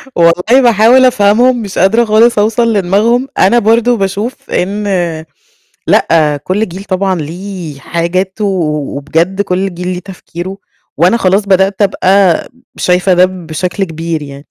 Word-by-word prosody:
والله 180 +10 +3
باحاول 240 +2 +4
أفهمهم 240 +2 +2
مش 200 -3 -7
قادرة 225 +6 +3
خالص 220 +1 +3
اوصل 225 +2 +1
لدماغهم، 215 +7 +1
أنا 235 +6 +4
برضو 235 +3 +2
باشوف 200 +5 -4
إن 200 +3 -2 1.0
لأ 150 -3 +2
كلّ 205 +6 -1
جيل 185 +3 -9
طبعًا 190 -1 -1
ليه 170 -2 -7
حاجاته، 185 +6 -2
و 150 -8 -2
وبجد 165 +7 -1
كلّ 190 -1 -2
جيل 180 +1 -6
ليه 180 -1 -3
تفكيره، 185 0 -8 0.4
وأنا 180 +8 +3
خلاص 195 0 +1
بدأت 195 +1 +1
أبقى 190 -2 +2 0.3
شايفة 180 +1 +1
ده 180 +1 +5
بشكل 180 +1 -4
كبير 165 -2 -4
يعني. 140 -1 -9
190 Hz, 135 wpm, -12 LUFS, 175-215 Hz, 1.0 s, ده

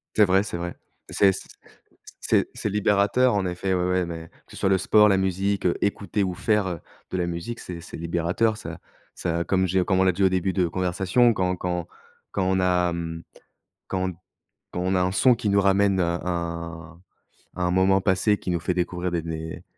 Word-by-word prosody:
C'est 105 - +6
vrai, 95 +1 +3
c'est 95 -4 -5
vrai. 85 0 -5 0.3
C'est 100 -1 +4
c - - -7 0.7
c'est - - +1
c'est - - -3
libérateur 105 +5 +2
en 100 -2 0
effet 90 +1 -2
ouais, 90 - +1
ouais, 90 0 +1
mais 85 -1 -7 0.2
que - - -21
ce - - -11
soit 95 - +1
le 95 - +4
sport, 105 +3 +5
la 95 - +3
musique, 95 +1 0
heu, 90 - +2
écouter 100 0 -1
ou 95 -1 -1
faire, 105 +1 +1
heu, 85 -3 -4 0.3
de - - -3
la 90 - 0
musique, 85 +7 -5
c'est 85 -2 -7
c'est 85 - -9
libérateur. 85 +7 0
Ça 85 -6 -8 0.4
ça 85 -1 -1
comme 95 0 +1
j'ai 95 +1 +2
comme 95 0 +1
on - - +4
l'a 95 - +4
dit 95 +3 -1
au 95 - +5
début 95 0 0
de 95 - 0
notre 85 - 0
conversation, 95 +7 +2
quand 90 -2 0
quand 90 -1 -3 0.4
quand 95 - -1
on 95 0 +2
a, 90 -1 +2
mmh, 80 -1 -5 0.6
quand 95 0 -1 0.6
quand 90 - -3
on 95 +1 0
a 90 - +2
un 90 +1 +1
son 125 +6 +5
qui 110 -2 -2
nous 100 0 +3
ramène, 100 0 +3
heu, - - +3
un 85 -1 -4 0.5
à 90 - -2
un 90 - +1
moment 95 +1 +4
passé, 100 +2 +2
qui 90 - -4
nous 85 - 0
fait 90 +2 -1
découvrir 90 0 -2
des 85 -1 -1
des 80 0 -6
90 Hz, 220 wpm, -24 LUFS, 85-95 Hz, 0.7 s, C'est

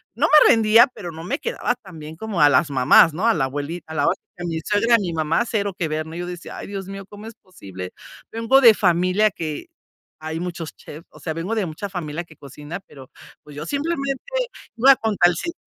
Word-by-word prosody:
no 285 +6 +2
me 305 -1 +7
rendía, 225 +2 +6
pero 185 -8 -9
no 160 0 -9
me 275 - -3
quedaba 465 - -2
tan 190 -9 -14
bien 155 +1 -9
como 220 -5 -3
a 145 - +7
las 145 +3 +3
mamás, 140 +4 +5
¿no? 190 +9 -1
A 230 - +5
la 135 -5 0
abuelita, 145 +4 -6
a - - -7
la 145 - +1
otra, - - 0 0.2
a - - -5
mi 165 -1 -3
suegra, 230 +3 +3
a - - +5
mi 180 -4 -3
mamá, 160 +6 0
cero 205 -4 -2
que 170 - -1
ver, 155 +1 -3
¿no? 160 - -9
Y - - -6
yo 175 - -4
decía: 175 -1 -8
"Ay, - - -8
Dios 195 -2 -6
mío, 195 0 -8
¿cómo 205 +1 -12
es 225 - -10
posible?" 95 - -10 0.4
Vengo 230 +4 +3
de 230 -4 +8
familia 185 +3 +2
que 155 -4 -6 0.5
hay 160 +1 -4
muchos 170 -3 -6
chefs, 155 +3 -12
o - - -16
sea, 160 - -4
vengo 170 +8 -3
de 215 -4 0
mucha 160 +6 -6
familia 170 -3 -5
que 160 - -17
cocina, 150 +5 -9
pero, 135 -6 -15 0.3
pues, 150 - -14
yo 150 +1 -6
simplemente 275 - -2 0.5
iba 265 +4 +7
a - - -6
contra 205 -6 +2
el - - -3
sistema. 340 -1 -4
175 Hz, 240 wpm, -22 LUFS, 155-220 Hz, 0.5 s, de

